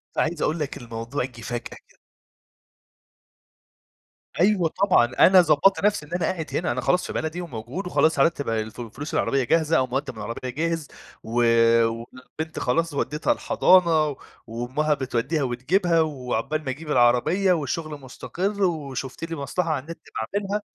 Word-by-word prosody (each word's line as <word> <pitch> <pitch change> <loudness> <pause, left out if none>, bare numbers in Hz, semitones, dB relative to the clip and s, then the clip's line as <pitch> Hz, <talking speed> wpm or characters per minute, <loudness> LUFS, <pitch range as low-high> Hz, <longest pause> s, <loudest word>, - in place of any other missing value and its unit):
فعايز 160 0 0
أقول 160 +2 0
لك 145 -1 -3
الموضوع 120 +2 -4
جِه 120 -2 -12
فجأة 120 0 -3 0.3
كده. - - -25 2.4
أيوه 180 -2 +2
طبعًا 185 -11 +3
أنا 185 -1 +8
ضبّطت 170 +5 +3
نفْسي 205 -7 +1
إن 150 - -20
أنا 175 -2 0
قاعد 160 -1 -2
هنا، - - 0
أنا 130 - -2
خلاص 180 - +1
في - - -6
بلدي 160 +3 -3
وموجود 155 - -6
وخلاص 160 -4 +2
هرتّب 140 -4 +2
الفُ 110 +1 -3
فلوس 130 +7 -7
العربية 135 -1 +1
جاهزة 160 +5 +2
أو 130 - +1
مُقدّم 130 -1 -3
العربية 115 +3 -5
جاهز، 165 +3 -2 0.4
و - - -10 0.6
والبنت 130 +7 -7
خلاص 165 +5 0
ودّيتها 150 +2 -1
الحضانة، 160 -6 +3 0.3
وأمّها 130 +7 -1
بتودّيها 135 +2 -1
وتجيبها، 165 +8 +1
وعقبال 145 0 -2
ما - - -2
أجيب 150 +4 -5
العربية 125 +10 +3
والشغل 155 -1 -3
مستقر، 195 +9 -3
وشُفت 140 -6 -3
لي 165 0 -4
مصلحة 165 +4 -2
على 155 -3 0
النت 165 +1 -8 0.3
باعملها 205 +1 -2
150 Hz, 145 wpm, -24 LUFS, 130-170 Hz, 2.4 s, أنا